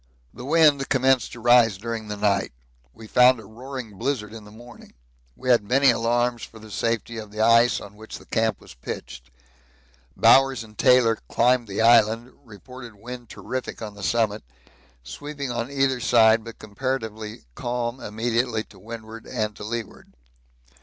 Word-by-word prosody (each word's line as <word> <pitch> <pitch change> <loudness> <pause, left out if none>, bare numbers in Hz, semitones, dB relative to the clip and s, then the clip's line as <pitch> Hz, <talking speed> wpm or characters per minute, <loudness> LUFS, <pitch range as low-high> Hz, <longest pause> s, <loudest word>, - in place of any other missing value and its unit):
The 125 - -9
wind 150 -2 +4
commenced 130 -2 +2
to 120 - -9
rise 120 -3 +5
during 115 +1 -5
night. 105 - 0 0.4
We 110 - -13
found 125 +2 +5
a 110 - -12
roaring 115 -1 -9
blizzard 115 -7 -2
in 110 -2 -10
the 105 - -14
morning. 120 - -15 0.4
We 130 - -5
had 120 -4 +5
many 130 +5 +4
alarms 120 +1 0
for 115 - -10
the 110 -1 -13
safety 115 +1 -2
of 110 -1 -9
the 110 +1 -5
ice 115 +2 +4
on 100 - -12
which 110 +1 -10
the - - -16
camp 110 -2 0
was - - -14
pitched. 60 0 -8 0.9
Bowers 135 -2 +5
and 110 -1 -16
Taylor 125 -3 +4
climbed 125 0 +2
the 100 +2 -3
island; 115 +1 +4
reported 120 +1 -12
wind 120 +2 -10
terrific 130 0 -6
on 105 -1 -6
the 100 - -12
summit 110 0 0 0.6
sweeping 145 - -6
on 120 +1 -3
either 135 -2 0
side 115 -2 +4
but 115 0 -10
comparatively 110 -1 -5
calm 120 - -3
immediately 115 +1 -1
to 95 - -19
windward 110 +2 -10
and 110 -4 -3
to - - -9
leeward. 115 +1 -6
115 Hz, 160 wpm, -24 LUFS, 110-125 Hz, 0.9 s, rise